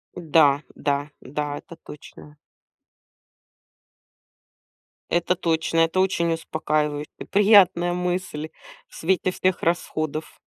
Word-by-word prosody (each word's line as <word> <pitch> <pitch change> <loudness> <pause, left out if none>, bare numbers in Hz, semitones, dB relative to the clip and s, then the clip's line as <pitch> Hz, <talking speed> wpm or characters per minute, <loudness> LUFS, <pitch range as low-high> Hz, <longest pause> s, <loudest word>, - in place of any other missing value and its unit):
Да, 150 -4 +3
да, 145 0 -1
да, 145 +2 -4
это 170 - -12
точно. 150 -1 -13 2.7
Это 175 +1 +1
точно. 165 -2 0
Это 165 +3 +2
очень 170 -3 +1
успокаивающе, 150 -2 -2 0.2
приятная 195 -4 +5
мысль 180 -3 -3 0.4
в - - -18
свете 185 +2 0
всех 185 0 0
расходов. 155 -2 -2
165 Hz, 90 wpm, -23 LUFS, 150-180 Hz, 2.7 s, приятная